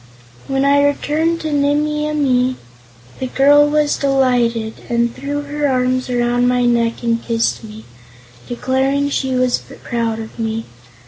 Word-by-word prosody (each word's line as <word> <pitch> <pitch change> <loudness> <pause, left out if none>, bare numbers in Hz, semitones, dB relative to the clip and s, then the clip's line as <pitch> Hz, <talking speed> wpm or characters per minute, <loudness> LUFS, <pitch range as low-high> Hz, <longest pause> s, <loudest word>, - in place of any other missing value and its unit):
When 270 0 0
I 285 0 +4
returned 310 +3 0
to 315 - -3
Nimmie 295 +1 +1
Amee, 260 -4 +1 0.6
the 260 - -2
girl 290 +3 +5
was 300 0 +1
delighted 245 -5 +1 0.2
and 235 0 0
threw 285 +1 -4
her 290 0 -2
arms 255 -1 0
around 245 0 +1
my 250 0 +2
neck 235 -1 +1
and 230 -1 0
kissed 230 -1 -1
me, 215 0 -11 0.6
declaring 265 +3 0
she 265 -2 -1
was 250 -1 +1 0.2
proud 230 -2 -2
of 225 +1 -9
me. 225 0 -2
255 Hz, 140 wpm, -18 LUFS, 235-285 Hz, 0.6 s, girl